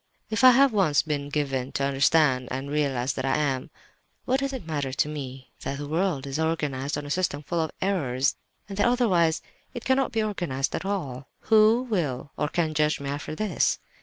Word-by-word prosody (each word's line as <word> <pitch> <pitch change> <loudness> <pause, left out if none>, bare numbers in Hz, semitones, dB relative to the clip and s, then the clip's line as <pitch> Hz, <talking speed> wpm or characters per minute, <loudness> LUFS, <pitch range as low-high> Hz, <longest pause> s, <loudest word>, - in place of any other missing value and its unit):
If 220 +4 0
I 255 - +11
have 265 0 +5
once 180 -8 +3
been 145 -2 -3
given 135 -3 -1
to 140 - -1
understand 140 -1 +3
and 135 +2 -4
realize 140 -4 0
that 130 - -4
I 135 0 +1
am—what 150 - -3
does 275 0 -1
it 260 -9 -6
matter 145 -4 -2
to 135 - +1
me 135 -3 -7
that 140 - -3
the 145 0 -5
world 160 -3 0
is 140 +2 -3
organized 150 -3 -1
on 145 - -5
a 145 - -6
system 175 -5 -1
full 170 +3 -1
of 160 - -1
errors 140 -9 +1 0.3
and 195 -1 -7
that 205 - +4
otherwise 185 -10 +2 0.3
it 240 - -6
cannot 265 0 +2
be 225 -1 0
organized 175 -11 -2
at - - -3
all? 145 -10 -3 0.2
Who 220 +3 +6
will 150 - -2
or 150 - -1
can 160 0 -1
judge 150 0 +1
me 140 0 -4
after 145 +2 -5
this? 215 +3 +1
150 Hz, 195 wpm, -26 LUFS, 140-195 Hz, 0.3 s, I